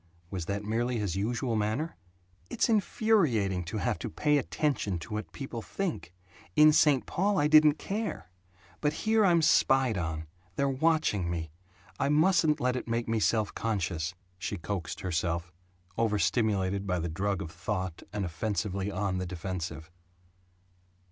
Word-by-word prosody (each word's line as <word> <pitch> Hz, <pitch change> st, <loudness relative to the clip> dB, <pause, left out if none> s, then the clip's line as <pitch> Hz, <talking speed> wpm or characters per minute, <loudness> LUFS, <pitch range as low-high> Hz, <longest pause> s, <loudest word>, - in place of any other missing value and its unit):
Was 90 Hz, -4 st, -4 dB
that 100 Hz, +1 st, -2 dB
merely 120 Hz, +3 st, -1 dB
his 100 Hz, -5 st, -2 dB
usual 115 Hz, +4 st, -1 dB
manner? 110 Hz, +10 st, -1 dB, 0.5 s
"It's -, -, +1 dB
infuriating 165 Hz, -, +2 dB
to 100 Hz, +6 st, -4 dB
have 100 Hz, -, -1 dB
to -, -, -4 dB
pay 150 Hz, -, +2 dB
attention 140 Hz, -, -1 dB
to 85 Hz, +5 st, -8 dB
what 105 Hz, 0 st, -4 dB
people 135 Hz, -5 st, -6 dB
think. 175 Hz, -, -4 dB, 0.4 s
In 155 Hz, 0 st, +7 dB
St. 145 Hz, -4 st, +4 dB
Paul 200 Hz, +2 st, 0 dB
I 145 Hz, -, +3 dB
didn't 155 Hz, 0 st, +6 dB
care. 205 Hz, -, -4 dB, 0.5 s
But 150 Hz, 0 st, +1 dB
here 220 Hz, 0 st, +4 dB
I'm 170 Hz, -4 st, +4 dB
spied 130 Hz, -8 st, +4 dB
on. 80 Hz, -2 st, -3 dB, 0.3 s
They're 140 Hz, -, +1 dB
watching 135 Hz, -, +1 dB
me. 80 Hz, -2 st, -3 dB, 0.5 s
I 140 Hz, -, +1 dB
mustn't 155 Hz, 0 st, +4 dB
let 125 Hz, 0 st, +1 dB
it 125 Hz, -, -4 dB
make 115 Hz, 0 st, -1 dB
me 115 Hz, 0 st, +1 dB
self 110 Hz, 0 st, +1 dB
conscious," 90 Hz, -6 st, -2 dB, 0.2 s
she 100 Hz, -, -3 dB
coaxed 90 Hz, 0 st, -4 dB
herself 85 Hz, -1 st, -1 dB, 0.5 s
overstimulated 105 Hz, -3 st, +1 dB
by 90 Hz, -1 st, +1 dB
the 85 Hz, 0 st, -2 dB
drug 95 Hz, +3 st, -1 dB
of 80 Hz, -, -6 dB
thought, 90 Hz, 0 st, -4 dB
and 105 Hz, -2 st, -2 dB
offensively 95 Hz, +2 st, -2 dB
on 100 Hz, -2 st, -1 dB
the 90 Hz, -, -3 dB
defensive. 85 Hz, -2 st, -5 dB
105 Hz, 150 wpm, -29 LUFS, 90-145 Hz, 0.5 s, In